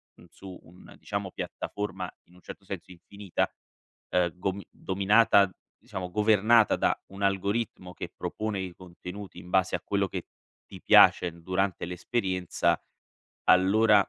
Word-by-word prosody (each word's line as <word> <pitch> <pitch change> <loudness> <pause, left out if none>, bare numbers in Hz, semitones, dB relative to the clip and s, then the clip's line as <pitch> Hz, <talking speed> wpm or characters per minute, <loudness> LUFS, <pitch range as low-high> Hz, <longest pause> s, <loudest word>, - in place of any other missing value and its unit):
mhmm, - - -17
su 95 +1 -11
un, 90 +2 -16
diciamo - - -4
piattaforma 95 -3 -5 0.2
in 90 - -23
un 90 - -18
certo 100 - -11
senso 95 -2 -7
infinita, 95 +2 -3 0.6
ehm, 90 -1 +1
gom 95 +1 -2
dominata 100 +1 +3 0.3
diciamo 90 -1 -6
governata 110 +2 +4
da - - +2
un 100 +1 -7
algoritmo 100 -1 -1
che - - -6
propone 110 -2 -3
i 90 -2 -5
contenuti 90 +1 -9
in 90 0 -12
base 95 0 +2
a - - -4
quello 100 -1 0
che - - -5 0.4
ti - - -12
piace 90 - +6
durante 95 +2 -1
l'esperienza, 90 0 -1 0.7
allora 100 +2 +5
95 Hz, 135 wpm, -28 LUFS, 90-100 Hz, 0.7 s, piace